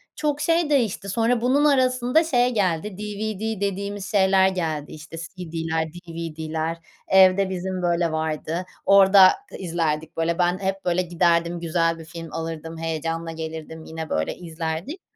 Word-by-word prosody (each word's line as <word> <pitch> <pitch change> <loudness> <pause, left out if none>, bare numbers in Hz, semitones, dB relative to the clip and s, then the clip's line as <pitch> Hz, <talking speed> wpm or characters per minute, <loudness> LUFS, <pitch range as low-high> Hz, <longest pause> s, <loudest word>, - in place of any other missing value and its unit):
çok 295 -1 -1
şey 330 -2 +2
değişti. 225 -8 +1
Sonra 230 +3 +1
bunun 275 +4 +3
arasında 255 +1 +3
şey 250 -5 +2
geldi, 190 -1 0
DVD 210 0 -4
dediğimiz 200 0 -3
şeyler 190 -2 +4
geldi, 160 -5 -3
işte, 155 +1 -10
CD'ler 165 -2 -3
DVD'ler 165 -1 -4 0.3
evde 190 0 +5
bizim, 185 0 -3
böyle, 170 -1 +1
vardı. 160 +2 -2 0.2
Orada 195 -1 +8 0.3
izlerdik, 160 -3 -2
böyle. 165 +1 0
Ben 175 +1 +2
hep, 195 0 -3
böyle, 180 +1 +2
giderdim 170 -1 +1
güzel 165 0 0
bir 160 - -10
film 165 -1 -9
alırdım. 165 0 -5
Heyecanla 165 +1 -3
gelirdim 160 0 -7
yine, 160 -1 -6
böyle, 80 0 -1
izlerdik. 165 - -5
175 Hz, 140 wpm, -23 LUFS, 165-200 Hz, 0.3 s, Orada